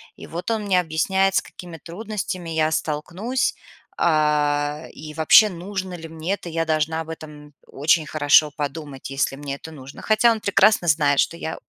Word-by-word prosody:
и - - -11
вот 175 +7 -4
он 220 -2 -1
мне 190 -3 +2
объясняет, 190 +4 +1
с - - +4
какими 175 -2 -11
трудностями 185 -2 -5
я 160 0 +1
столкнусь, 180 - -2 0.4
а, 150 -1 +1
и 155 0 -9
вообще 185 +7 +6
нужно 185 +1 -5
ли 165 -1 -9
мне 165 +5 -3
это. 175 - -12
Я 165 0 -1
должна 160 +1 0
об 160 - -9
этом 150 -2 -10
очень 155 +3 +1
хорошо 150 0 +4
подумать, 145 -2 -5
если 135 0 -1
мне 140 -1 -5
это 160 +3 -11
нужно. 135 -2 -11
Хотя 225 +2 +4
он 225 - -1
прекрасно 200 -2 +3
знает, 145 -2 +3
что 170 - -1
я 160 - -5
160 Hz, 175 wpm, -22 LUFS, 150-185 Hz, 0.4 s, вообще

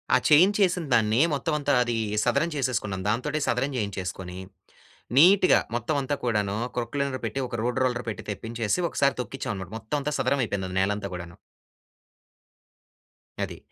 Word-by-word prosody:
ఆ - - +7
చేయించేసినదాన్ని 160 - +4
మొత్తం 150 +2 -1
అంతా 145 0 +1
అది 120 -1 -2 0.3
సదరం 125 +8 +2
చేసేసుకున్నాం. 115 -8 -1
దాంతోటే 145 +7 -1
సదరం 135 +4 0
చేయించేసుకొని, 95 -4 -4 0.8
నీట్‌గా 185 +5 +7 0.2
మొత్తం 120 +6 -1
అంతా 140 +2 -2
కూడాను, 105 -4 0 0.2
క్రోక్లైనర్ 130 +2 -2
పెట్టి, 125 +5 -2
ఒక - - -4
రోడ్ 125 +1 0
రోలర్ 120 -1 -1
పెట్టి 110 - -6
తెప్పించేసి, 115 - -2
ఒకసారి 140 -1 +1
తొక్కించాం 130 -1 -5
అన్నమాట. 95 +1 -8
మొత్తం 110 +7 -3
అంతా 150 +2 -2
సదరం 140 -1 +1
అయిపోయింది 95 -3 -3
నేలంతా 100 +1 0
గూడాను. 85 -1 -9 2.1
అది. - - -5
120 Hz, 135 wpm, -26 LUFS, 105-140 Hz, 2.1 s, ఆ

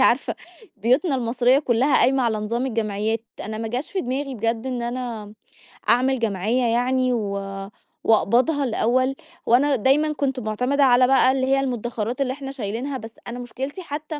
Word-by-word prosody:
عارفة 255 0 +3 0.4
بيوتنا 255 - +2
المصريّة 245 +1 +2
كلّها 260 0 +2
قايمة 265 +1 +3
على 225 -3 +1
نظام 230 +4 -2
الجمعيات، 220 -1 -1 0.2
أنا 215 0 -5
ما 225 0 -3
جاش 250 +6 -4
في 390 - -1
دماغي 270 +1 -3
بجد 230 +1 -2
إن 250 -2 -3
أنا 240 -2 -4
امم 210 0 -12 0.6
أعمل 255 +2 +3
جمعية 220 +2 0
يعني 250 +2 +1
و 215 -4 -1 0.7
وأقبضها 250 +7 +3
الأوّل، 255 +2 +1 0.3
وأنا 275 +4 +4
دايمًا 280 +6 +2
كنت 275 -3 -1
معتمدة 250 +6 0
على 250 -1 +5
بقى 265 0 +5
اللي 260 0 0
هي 270 0 +3
المُدخرات 240 -1 -3
اللي 260 -1 0
إحنا 270 0 -7
شايلينها، 255 +2 -4
بس 225 -1 -9 0.2
أنا 240 +1 -5
مشكلتي 265 +7 -6
حتّى 305 -1 -6
250 Hz, 165 wpm, -23 LUFS, 230-270 Hz, 0.7 s, على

